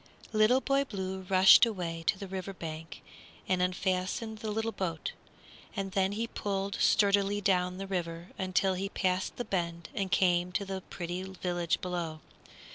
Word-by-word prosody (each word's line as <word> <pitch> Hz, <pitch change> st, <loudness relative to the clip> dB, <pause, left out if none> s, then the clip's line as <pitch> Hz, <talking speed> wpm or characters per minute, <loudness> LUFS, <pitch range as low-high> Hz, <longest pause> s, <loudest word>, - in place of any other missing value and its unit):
Little 220 Hz, +5 st, +5 dB
Boy 275 Hz, 0 st, +2 dB
Blue 190 Hz, -6 st, -5 dB
rushed 190 Hz, -1 st, +8 dB
away 175 Hz, -7 st, 0 dB
to 200 Hz, -, +3 dB
the 195 Hz, -, -6 dB
river 190 Hz, +1 st, -5 dB
bank 160 Hz, -2 st, -7 dB, 0.4 s
and 185 Hz, -1 st, +2 dB
unfastened 185 Hz, +4 st, -1 dB
the 220 Hz, -, -4 dB
little 225 Hz, +2 st, -1 dB
boat; 170 Hz, -6 st, -3 dB, 0.6 s
and 195 Hz, -2 st, -3 dB
then 195 Hz, 0 st, +1 dB
he 225 Hz, +3 st, -1 dB
pulled 200 Hz, -3 st, -3 dB
sturdily 200 Hz, 0 st, +4 dB
down 180 Hz, -2 st, +1 dB
the 195 Hz, -, -4 dB
river 175 Hz, -2 st, -4 dB
until 190 Hz, 0 st, +1 dB
he 195 Hz, +2 st, -2 dB
passed 185 Hz, -1 st, 0 dB
the 245 Hz, -, -4 dB
bend 170 Hz, -4 st, -2 dB
and 195 Hz, -2 st, -2 dB
came 180 Hz, -2 st, +3 dB
to 200 Hz, -, -1 dB
the 190 Hz, -1 st, -4 dB
pretty 175 Hz, +1 st, -4 dB
village 180 Hz, -2 st, -2 dB
below. 170 Hz, -3 st, -3 dB
190 Hz, 160 wpm, -31 LUFS, 180-200 Hz, 0.6 s, rushed